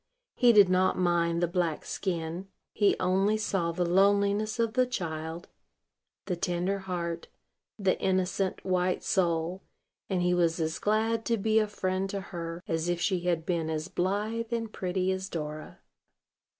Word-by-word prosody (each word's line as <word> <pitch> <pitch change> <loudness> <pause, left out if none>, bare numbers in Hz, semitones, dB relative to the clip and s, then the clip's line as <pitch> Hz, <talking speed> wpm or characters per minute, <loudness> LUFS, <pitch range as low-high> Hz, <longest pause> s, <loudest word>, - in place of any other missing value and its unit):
He 245 -1 +5
did 205 -4 +7
not 185 +1 +2
mind 170 -1 +1
the - - +3
black 170 -2 -1
skin: 175 0 -3 0.3
he 205 -1 +3
only 195 +4 +2
saw 195 -5 0
the 175 +1 -1
loneliness 200 +4 +3
of 230 -2 0
the 255 0 +3
child, 165 -5 -4 0.8
the 180 - -1
tender 180 +3 -1
heart, 175 -3 -4 0.5
the 195 -3 +1
innocent, 185 0 0
white 185 -1 +1
soul; 175 0 0 0.5
and 185 -3 0
he 180 0 +3
was 170 -1 +2
as 160 +1 -1
glad 220 +2 +1
to 230 - +1
be 220 +2 +3
a 215 - +1
friend 190 -1 -2
to 200 - -3
her 170 0 -5
as 165 +1 -1
if 175 -1 0
she 185 +1 +1
had 170 -2 0
been 165 -3 -1
as 155 +2 -3
blithe 210 +5 -1
and 230 -2 -2
pretty 185 0 -1
as 190 +1 -3
Dora. 155 -1 -6
185 Hz, 160 wpm, -29 LUFS, 170-200 Hz, 0.8 s, did